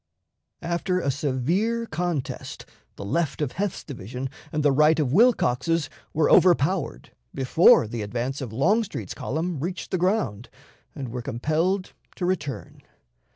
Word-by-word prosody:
After 175 +2 0
a 140 - 0
severe 165 - 0
contest, 170 - -4 0.3
the 100 - -7
left 160 +7 -1
of 145 -4 -1
Heth's 200 0 -3
division 125 0 -6 0.2
and 150 -1 -1
the 145 - +4
right 150 +3 +4
of 140 -4 0
Wilcox's 165 - +3 0.2
were 155 -1 +2
overpowered 175 -1 +3 0.2
before 135 0 +5
the 115 0 -4
advance 120 +6 -3
of 125 -5 -5
Longstreet's 200 - 0
column 160 +2 -3
reached 175 +5 -4
the 185 - 0
ground, 180 - 0 0.5
and 135 -5 -5
were 125 +1 -4
compelled 155 - -1 0.2
to 180 - -3
return. 150 -7 -3
155 Hz, 135 wpm, -25 LUFS, 130-180 Hz, 0.5 s, before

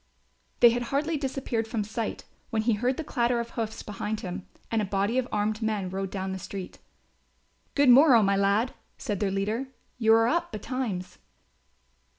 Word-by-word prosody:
They 240 -1 +9
had 240 +1 -1
hardly 300 +4 0
disappeared 265 -5 -2
from 220 -2 -1
sight, 220 +1 -4 0.3
when 220 -3 0
he 230 0 +3
heard 245 +5 0
the 320 - -3
clatter 240 -4 +1
of 235 0 -4
hoofs 220 -2 -4
behind 210 +1 -4
him 180 0 -6 0.2
and 225 -1 +2
a - - 0
body 200 +5 +1
of 255 - -2
armed 210 +1 0
men 210 -4 -1
rode 195 0 -3
down 190 0 -3
the 190 - -4
street. 190 0 -7 1.0
"Good 285 -1 +4
morrow, 250 -3 +8
my 200 0 +3
lad," 200 +5 +2 0.2
said 205 -3 -3
their 205 - +1
leader, 210 +7 -1 0.3
"you 220 -2 +4
are 225 0 +4
up 340 +7 0
betimes." 215 -4 -4
220 Hz, 175 wpm, -27 LUFS, 200-245 Hz, 1.0 s, They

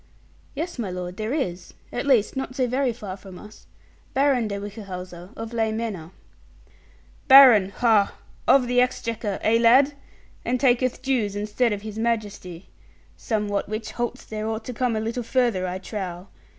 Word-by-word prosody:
'Yes, 325 -1 -4
my 215 -5 -2
lord, 180 0 -6
there 215 +2 -3
is. 185 - -3 0.2
At 245 +4 -3
least, 245 -5 +3
not 265 -1 -4
so 260 - +1
very 255 +1 0
far 210 -5 -7
from 190 -1 -12
us. 210 +3 -14 0.5
Baron 265 -4 +2
de 200 -1 -3
Whichehalse, 195 -3 -7 0.2
of 225 +1 -7
Ley 225 -1 0
Manor.' 215 -8 -4 1.2
'Baron, 255 -8 +9
ha! 215 -1 +2 0.3
of 265 -3 +5
the 245 0 +3
Exchequer 230 -4 -2
eh, 230 +1 +3
lad? 260 +5 +5 0.5
And 250 +1 -1
taketh 255 -1 +2
dues 235 -7 0
instead 210 +4 0
of 205 0 -3
His 215 0 -6
Majesty. 205 -6 -3 0.5
Somewhat 210 -3 -2
which 215 +1 -4
halts 240 -1 -4
there 215 0 -4
ought 220 0 -3
to 250 - -5
come 245 -1 0
a - - 0
little 225 +3 -3
further, 230 -6 0
I 180 +1 -3
trow. 185 -2 -6
220 Hz, 165 wpm, -24 LUFS, 200-245 Hz, 1.2 s, Baron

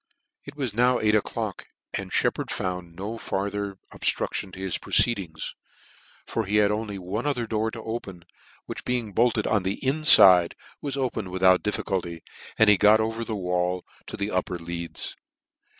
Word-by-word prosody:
It - - -10
was 130 -7 -3
now 125 +2 +3
eight 105 0 +2
o'clock, 110 - -2 0.3
and - - -3
Sheppard - - 0
found 90 -3 -4
no 105 +5 -5
farther 100 0 -3 0.2
obilrudlion 95 - -1
to - - -9
his 95 -3 -1
proceedings; 95 -9 0 0.7
for 115 - -2
he 100 +2 -1
had 105 -1 +4
only 105 -1 -3
one 95 +8 -4
other 125 -5 0
door 110 0 -1
to 110 0 -8
open, 100 -6 -6 0.4
which - - -7
being 120 -4 -2
bolted 115 -1 +2
on 105 -2 +2
the 95 +2 -2
infide, 100 - +7 0.3
was 140 -2 -3
opened 125 -7 -2
without 95 0 +4
diffi 105 - -2
culty, 85 -3 -3 0.4
and 110 - +5
he 105 -1 +7
got 105 +2 +6
over 110 +1 -2
a 115 -1 -3
wall 90 -1 -1 0.2
to - - -6
the 100 +1 -2
upper 90 -1 -1
leads. 85 0 -5
105 Hz, 165 wpm, -25 LUFS, 90-115 Hz, 0.7 s, infide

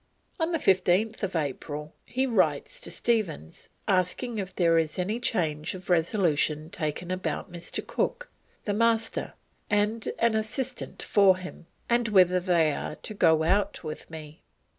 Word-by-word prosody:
On 325 +1 0
15th 195 - +2
April 150 +1 -5
he 260 +2 0
writes 265 - +1
to - - -5
Stephens 195 - -2 0.2
asking 200 +5 0
if 190 -1 -5
there 170 -2 +3
was 160 -2 +1
"any 200 +6 -1
change 165 -11 -1
of 185 0 -6
resolution 160 -3 +1
taken 165 +2 -3
about 185 0 -3
Mr. 175 0 -5
Cook, - - -2 0.4
the 205 - 0
Master, 225 +1 +1 0.4
and 210 +2 +1
an 230 -1 +3
assistant 235 +4 -3
for 195 -3 +5
him, 185 -2 -10 0.2
and 235 0 +2
whether 185 -3 +5
they 170 -4 +2
are 150 - -4
to 215 - -7
go 160 -5 +4
out 195 +5 +1
with 155 - -7
me?" 155 -2 -10
185 Hz, 140 wpm, -27 LUFS, 165-220 Hz, 0.4 s, for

